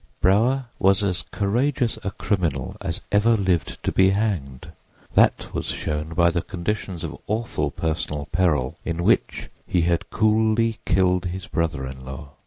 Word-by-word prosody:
Brower 120 +8 +3
was 95 +1 +4
as 90 -3 0
courageous 120 +4 0
a - - -1
criminal 90 -9 -2
as 85 - -3
ever 110 +3 +4
lived 95 -5 -1
to - - 0
be 95 0 +4
hanged; 95 -11 -2 0.4
that - - +3
was - - -3
shown 75 +2 -3
by 85 0 +4
the 85 - 0
conditions 90 0 -4
of - - -4
awful 110 -9 -1
personal 75 -1 -3
peril 80 -5 +1
in 85 0 -2
which - - +1 0.2
he 90 - +2
had 85 0 0
coolly 110 +1 +2
killed 90 -1 +2
his 90 +1 -4
brother 80 -6 -1
in 65 0 -8
law. 65 +2 -8
90 Hz, 155 wpm, -23 LUFS, 80-105 Hz, 0.4 s, was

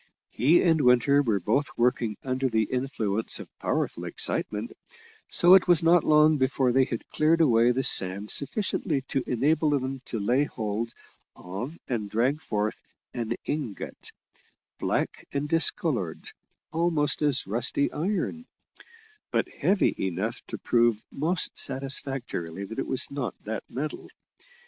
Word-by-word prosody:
He 150 +9 +3
and 160 -3 +3
Winter 125 +3 +4
were 110 -7 0
both 115 - 0
working 120 -3 +1
under 130 0 -1
the 110 -2 +2
influence 115 -4 -2
of - - -9
powerful - - -2
excitement, 105 +2 -1 0.6
so 175 +1 +6
it 190 - +6
was 175 -2 +5
not 170 0 +5
long 155 0 +5
before 130 -1 +1
they 130 +1 +3
had 115 - -6
cleared 160 +2 +2
away 120 -6 +4
the 130 +2 -1
sand 100 -1 +2
sufficiently 160 -2 0
to 135 - -1
enable 150 +6 +1
them 135 -2 -2
to 115 - -4
lay 125 +8 +2
hold 110 -2 -4 0.4
of 110 - -7
and 110 -5 -3
drag 125 +8 0
forth 105 -4 -2 0.3
an 115 -1 -2
ingot, 140 -9 -5 0.7
black - - -2
and 140 +1 -1
discoloured 150 - +1 0.4
almost 160 -3 +1
as 145 -3 +2
rusty 120 +7 0
iron, 205 +8 -3 0.8
but - - 0
heavy 195 0 +1
enough 95 +6 -2
to - - -5
prove 120 -2 +1
most 165 +5 0
satisfactorily 130 - -2
that 110 +5 -7
it - - -3
was 130 +1 -2
not 140 -3 -4
that 110 0 -4
metal. 150 +4 -5
130 Hz, 140 wpm, -26 LUFS, 115-150 Hz, 0.8 s, so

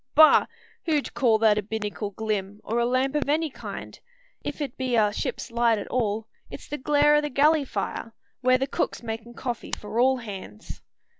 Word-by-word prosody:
Bah! 310 +1 +7 0.4
who'd 300 -3 0
call 230 -4 +3
that 215 -1 +4
a - - -1
binnacle 210 0 -4
glim, 205 -1 -3
or 230 +2 -1
a 235 - +2
lamp 260 +2 +1
of 295 -1 -1
any 310 +1 +1
kind? - - -8 0.4
If't 285 -5 -4
be 255 -2 -1
a 210 -2 +3
ship's 235 - -4
light 235 -1 +3
at 205 - -5
all, 220 -3 -1 0.2
it's - - -9
the 295 - -5
glare 295 +2 +4
o' - - +3
the 295 - -3
galley 295 +2 +3
fire, 230 0 -4 0.3
where 255 0 +4
the 265 - 0
cook's 270 - -2
makin' 225 +1 -6
coffee 240 -2 -5
for 215 +2 -4
all 260 +1 +4
hands." 195 - -9
240 Hz, 190 wpm, -26 LUFS, 215-275 Hz, 0.4 s, Bah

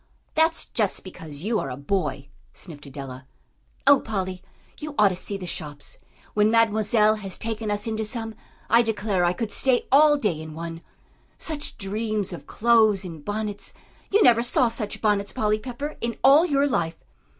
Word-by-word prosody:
"That's 320 +1 +2
just 210 -4 -1
because 160 -5 -9
you 220 +1 0
are 135 - -3
a 125 - -6
boy," 145 -3 -2 0.3
sniffed 150 -5 -10
Adela. 130 -1 -8 0.6
"Oh, 280 0 +7
Polly, 190 -4 -4 0.4
you 300 -1 -6
ought 210 -1 +6
to 185 - -3
see 200 +2 -2
the 185 - -7
shops! 150 -4 -6 0.3
When 210 0 +3
Mademoiselle 220 -1 +3
has 195 -3 -5
taken 225 -1 -3
us 205 0 -1
into 220 -1 -2
some, 225 +1 -2 0.3
I 230 +2 +5
declare 210 -5 0
I 175 0 +3
could 220 +2 -4
stay 255 +2 +2
all 295 +2 +6
day 200 - -1
in 160 -1 -9
one. 165 0 -6 0.6
Such 305 -2 -4
dreams 210 -1 -2
of 175 - -9
clothes 220 -4 +3
and 165 -4 -8
bonnets! 205 0 -4 0.3
You 415 +1 +4
never 235 -1 +6
saw 245 0 +2
such 215 -2 -4
bonnets, 205 -2 +1
Polly 215 0 0
Pepper, 265 +6 -6
in 235 0 -2
all 290 +6 +7
your 280 -2 +2
life!" 170 - -1
210 Hz, 170 wpm, -24 LUFS, 180-235 Hz, 0.6 s, Oh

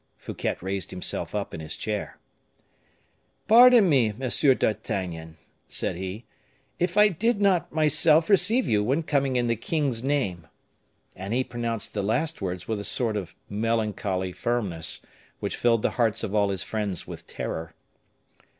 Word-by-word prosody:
Fouquet - - -4
raised 95 -1 -3
himself - - -4
up - - -3
in - - -6
his 80 -1 -6
chair. 105 -1 -4 1.3
"Pardon 235 -1 +8
me, 130 -9 +3
Monsieur 130 +3 +3
d'Artagnan," 85 -8 -3 0.3
said - - -2
he, 95 +5 -6 0.5
"if 180 +2 -1
I 210 0 +8
did 205 +5 0
not 190 -5 +2
myself 155 +1 +4
receive 225 +5 +3
you 105 -1 +2
when 135 +9 0
coming 140 -4 0
in 120 -1 +1
the 115 0 +1
king's 130 -1 -1
name." 100 - -1 0.7
And 95 +5 -4
he 130 - +2
pronounced 115 -3 -3
the 105 - -1
last 130 +10 -1
words 90 -1 -4
with 110 -2 -2
a - - -5
sort 115 0 0
of 100 -5 -5
melancholy 105 -4 -1
firmness, 95 -8 -2 0.3
which - - -3
filled 115 -2 +2
the - - +1
hearts 115 -1 +1
of 100 - -3
all 100 -2 +2
his 95 -2 -2
friends 105 -5 -3
with - - -10
terror. 80 0 -5
115 Hz, 155 wpm, -25 LUFS, 100-145 Hz, 1.3 s, Pardon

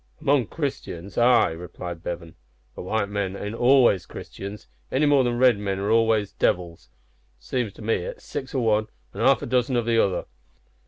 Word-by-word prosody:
"Among 135 -5 +2
Christians 100 - -5
ay," 120 -5 +4
replied 85 0 -7
Bevan; 85 -1 -6 0.4
"but - - -8
white 100 +3 -1
men 100 -2 -3
ain't 105 +2 -5
always 120 -7 +4
Christians, 100 0 -9 0.2
any 145 +3 +2
more 145 -2 +4
than 120 -1 0
red 125 -4 +4
men 100 -2 -2
are 100 +2 -1
always 110 -2 +2
devils. 85 -2 -1 0.5
Seems 105 - -3
to - - -12
me 110 +1 +1
it's 90 - -7
six 140 -1 -6
o' 130 - +1
one 110 -1 +2 0.3
an' - - -6
half - - +4
a - - -2
dozen 125 0 +1
o' - - +3
the 115 0 +3
other. 95 - -1
110 Hz, 180 wpm, -24 LUFS, 95-125 Hz, 0.5 s, ay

